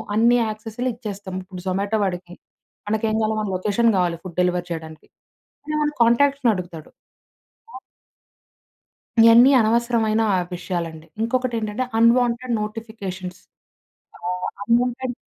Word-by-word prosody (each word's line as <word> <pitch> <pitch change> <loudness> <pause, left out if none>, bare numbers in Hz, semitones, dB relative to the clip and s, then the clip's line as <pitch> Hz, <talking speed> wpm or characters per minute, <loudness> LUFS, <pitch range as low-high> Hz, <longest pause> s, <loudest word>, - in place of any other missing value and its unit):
అన్ని 235 +3 +4
యాక్సెస్‌లు 220 +3 -4
ఇచ్చేస్తాం. 205 -5 -7
ఇప్పుడు 185 -1 -10
జొమాటో 200 +3 0
వాడికి 180 -1 -4 0.5
మనకేం 220 +1 0
కావాలో 220 0 0
మన 210 - -3
లొకేషన్ 210 +5 +1
కావాలి 175 -2 +1
ఫుడ్ 180 -3 -9
డెలివరీ 180 -1 0
చేయడానికి 160 -2 -7 0.6
అంటే 305 +1 -3
మన 300 0 +1
కాంటాక్ట్స్‌నడుగుతాడు. 230 - +1 0.9
అ! - - -5 1.4
ఇవన్నీ 230 +3 +8
అనవసరమైన 225 -1 +2
ఆ - - +2 0.2
విషయాలండి. 170 -3 -5
ఇంకొకటెంటంటే 230 -1 -1 0.2
అన్‌వాంటెడ్ 240 +1 +3
నోటిఫికేషన్స్. 210 -4 -6 0.8
ఆహ్, 180 +1 -4 0.2
అన్‌వాంటెడ్ 245 +2 +1
215 Hz, 105 wpm, -22 LUFS, 185-235 Hz, 1.4 s, ఇవన్నీ